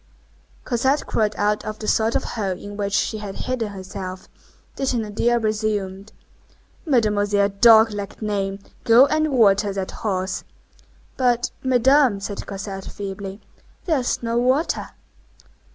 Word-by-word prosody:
Cosette 265 +4 +1
crawled 215 -1 0
out 210 +1 +1
of 215 0 -5
the 215 - -7
sort 220 +2 +2
of - - +1
hole 195 -5 -3
in 205 +2 -9
which 200 -1 -3
she 215 +2 0
had 205 -2 -7
hidden 250 -3 -2
herself. 190 -1 -7 0.5
The 270 - -2
Thénardier 235 -1 0
resumed:— 210 -2 -2 0.8
"Mademoiselle 205 -6 +2
Dog 220 +2 +6
lack 200 -1 -6
name, 200 -2 -2 0.3
go 240 +2 +7
and 310 +1 0
water 205 -5 +4
that 195 -1 -4
horse." 190 -3 -3 0.7
"But, 245 -1 +1
Madame," 260 -2 +4
said 200 0 -6
Cosette, 195 -1 -6
feebly, 195 0 -7 0.4
"there 315 -6 +2
is 245 -1 -2
no 230 0 0
water." 260 +7 +1
215 Hz, 135 wpm, -22 LUFS, 200-240 Hz, 0.8 s, go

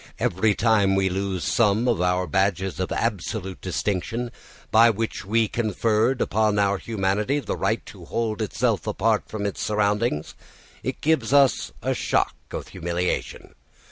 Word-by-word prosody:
Every 100 +3 +1
time 105 -4 +3
we 95 0 +2
lose 95 -1 -2
some 110 +1 +2
of 115 -7 +1
our 90 0 +1
badges 95 +2 0
of 95 - -2
absolute 100 -3 -2
distinction 105 +6 -2 0.4
by 115 +1 +7
which 115 -2 -3
we 110 +3 +2
conferred 115 +3 +1
upon 105 -1 +1
our 100 -1 +2
humanity 105 +5 0
the 125 - -3
right - - -1
to - - -12
hold 115 -1 -2
itself 105 - 0
apart - - +1
from 105 -2 -4
its 100 - -3
surroundings, 105 -5 0 0.5
it - - -4
gives 145 -5 +1
us 140 -2 +4
a - - +1
shock - - 0 0.2
of - - -6
humiliation. 85 0 -3
105 Hz, 145 wpm, -24 LUFS, 95-115 Hz, 0.5 s, by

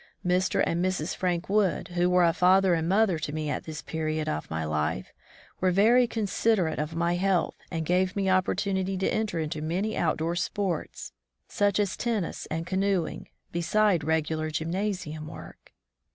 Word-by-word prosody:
Mr. 180 +1 +2
and 170 +1 0
Mrs. 185 -3 -1
Frank 175 -2 -1
Wood, 200 -4 +1
who 175 0 +1
were 180 0 +4
a 165 - +3
father 185 +2 +4
and 165 0 0
mother 195 -4 +3
to 155 - -4
me 155 -1 -2
at - - -3
this 155 -1 -7
period 155 -1 -2
of 75 +1 -3
my 80 0 -2
life, 75 -3 -2 0.5
were 185 - +2
very 225 +7 +5
considerate 205 -6 0
of 155 +2 -3
my 170 +1 +1
health 190 -1 +1 0.2
and 165 -2 -3
gave 185 +2 +1
me 200 -1 0
opportunity 190 0 +1
to 190 - 0
enter 215 -5 -1
into 155 -1 -3
many 185 +8 -1
outdoor 165 +1 0
sports, 180 -1 -3 0.4
such 205 0 +1
as 200 -2 0
tennis 220 -7 -2
and 165 +1 -3
canoeing^ 190 -1 -1 0.2
beside 180 +1 +2
regular 155 0 0
gymnasium 165 -1 -3
work. - - -11
180 Hz, 165 wpm, -27 LUFS, 160-195 Hz, 0.5 s, very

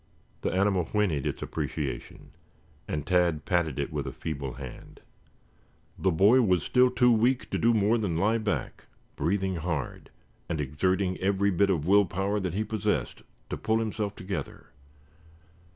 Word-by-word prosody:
The - - -1
animal 95 -2 +2
whinnied 90 -10 0
its - - -3
appreciation, 70 -6 -5 0.6
and 75 -2 -3
Tad 85 -4 +2
patted 85 -6 0
it - - -3
with - - -3
a - - -3
feeble 70 -4 -5
hand. 65 -1 -10 1.0
The 95 - +1
boy 100 +9 +5
was 90 -7 +2
still 125 0 +4
too 125 -1 +4
weak 120 +3 +2
to - - 0
do 115 - +4
more 110 +1 +3
than 95 -7 -1
lie 110 +6 +2
back, 85 - -3 0.3
breathing 95 +1 0
hard, 80 -4 -4 0.4
and 85 -3 -2
exerting 90 +6 0
every 100 +1 +1
bit 100 +2 +2
of 80 -6 0
will 100 +2 +5
power 95 +4 -1
that 95 -3 -3
he 105 - 0
possessed 105 - -2 0.3
to - - -2
pull 110 0 +1
himself 105 -2 -2
together. 95 -6 -6
95 Hz, 155 wpm, -28 LUFS, 80-105 Hz, 1.0 s, boy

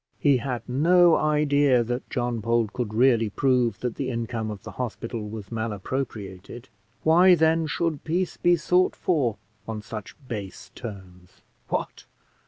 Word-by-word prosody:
He 140 -3 +3
had 125 -2 -4
no 170 +6 +5
idea 145 -4 +3
that 120 +2 -4
John 120 -1 -1
Bold 115 0 0
could 120 -4 -3
really 115 -1 +3
prove 125 -2 +1
that 125 -2 -3
the 135 -2 -2
income 115 -2 -3
of 105 -3 -7
the - - -8
hospital 115 -2 -4
was 105 -2 -8
malappropriated; 110 -1 -5 0.3
why, 175 +3 +6
then, 160 0 +2
should 160 -1 -2
peace 175 +3 -1
be 175 0 +3
sought 180 +3 +2
for 140 - 0 0.3
on 110 -2 -5
such 110 -2 -8
base 105 -5 -7
terms? 95 -5 -11 0.2
What! - - -4
120 Hz, 145 wpm, -25 LUFS, 110-150 Hz, 0.3 s, why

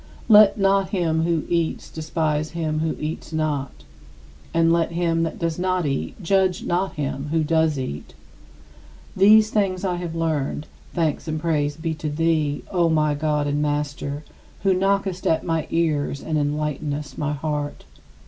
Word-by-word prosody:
" - - -22
"Let 210 -2 +7
not 195 -1 +2
him 165 -4 +1
who 170 -2 +1
eats 170 -2 -1
despise 155 -1 -1
him 155 -2 -1
who 160 0 -1
eats 155 +1 -5
not, 150 -4 -2 0.7
and 165 0 +3
let 170 0 +1
him 165 -1 +1
that 165 -1 -2
does 165 0 -2
not 185 -1 0
eat 135 +7 -3
judge 190 0 +2
not 185 +2 0
him 140 -1 -3
who 160 +1 +1
does 160 -1 +2
eat." 75 - -5 1.0
These 215 +3 +6
things 195 -2 0
I 180 -2 0
have 175 -2 -5
learned, 155 -3 -1 0.3
thanks 165 -2 -1
and 155 0 -2
praise 150 -3 0
be 160 0 -2
to 155 -1 -4
thee, 155 -1 0
O 175 -3 +2
my 155 -2 +2
God 150 0 0
and 145 +1 0
Master, 145 0 -2 0.4
who 195 -1 +4
knockest 195 0 0
at 160 - +1
my 165 -2 -1
ears 155 -4 0
and 160 - -2
enlightenest 145 -1 -2
my 150 0 -1
heart. 150 0 -3
160 Hz, 160 wpm, -23 LUFS, 150-175 Hz, 1.0 s, Let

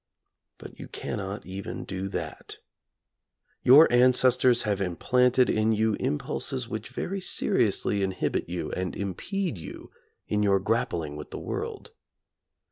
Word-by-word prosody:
But - - -12
you - - -8
cannot 100 0 -5
even 95 +1 -6
do 95 0 -4
that. - - -6 1.0
Your 145 +6 +8
ancestors 125 0 +4
have 100 -3 -1
im 90 -3 -2
planted 125 +4 +3
in 110 +1 +2
you 110 0 +1
impulses 75 - -1
which - - -6
very 195 +1 -4
seriously 100 - +1
in 95 -1 0
hibit 90 - -2
you 90 -1 -4
and 90 0 -3
impede 110 - -3
you - - -10 0.4
in 105 0 0
your 100 -1 +3
grappling 85 -8 -1
with 75 - -8
the - - -7
world. - - -5
105 Hz, 135 wpm, -27 LUFS, 95-125 Hz, 1.0 s, Your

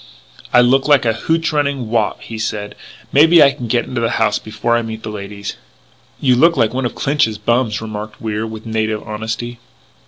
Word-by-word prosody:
"I 125 - +6
look 130 +3 +3
like 145 -4 +4
a 115 - +2
hootch 165 +7 -1
running 140 -5 0
Wop," 110 -3 0
he 110 -1 -7
said. 105 -2 -3 0.4
"Maybe 160 +3 +7
I 140 - +5
can 125 -3 -7
get 120 +1 +1
into 120 -2 -3
the 115 - +1
house 105 -2 +1
before 110 +2 -1
I 120 - +2
meet 110 -1 -7
the 110 - -5
ladies 100 0 -7 0.3
" - - -34
"You 130 -3 +3
look 165 +5 +4
like 115 -2 +2
one 130 -1 0
of - - -10
Clinch's 135 -7 +1
bums," 115 0 0
remarked 110 -1 -7
Wier 110 0 -3
with 110 0 -9
native 110 -1 -2
honesty. 115 +2 -5
115 Hz, 200 wpm, -17 LUFS, 110-130 Hz, 0.4 s, Maybe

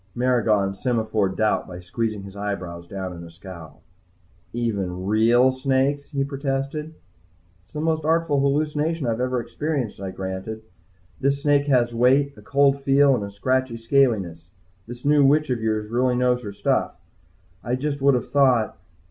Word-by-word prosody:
Maragon 115 -6 +2
semaphored 110 -3 -1
doubt 110 -1 +1
by 90 -1 -8
squeezing 105 +3 -3
his 100 0 -11
eyebrows 90 -4 -5
down 95 -1 -5
in 85 -1 -9
a 85 - -10
scowl. 85 -2 -12 0.7
"Even 100 -6 -2
real 115 +5 +4
snakes?" 135 +2 0
he 140 -3 -1
protested. 140 +3 -3 0.7
"It's - - -34
the 150 - -2
most 160 -1 0
artful 160 -2 +2
hallucination 150 +2 0
I've 115 0 -1
ever 125 0 0
experienced," 135 -4 -3
I 95 - -4
granted. 95 +4 -6 0.6
"This 140 +1 0
snake 145 -1 +3
has 120 -4 +2
weight, 135 +4 +3
a - - -14
cold 140 0 +2
feel 140 0 +4
and 120 - -1
a 100 - -5
scratchy 130 +4 -1
scaliness. 110 -9 +1 0.4
This 120 +2 -10
new 145 0 +5
witch 150 +1 +3
of 120 -2 -1
yours 110 -1 -1
really 125 +1 +2
knows 125 0 +2
her 105 -4 -6
stuff. 100 - -1 0.6
I 120 +2 -1
just 140 +1 -3
would 140 -1 +4
have 125 - -2
thought..." 130 -5 +3
125 Hz, 160 wpm, -23 LUFS, 105-140 Hz, 0.7 s, new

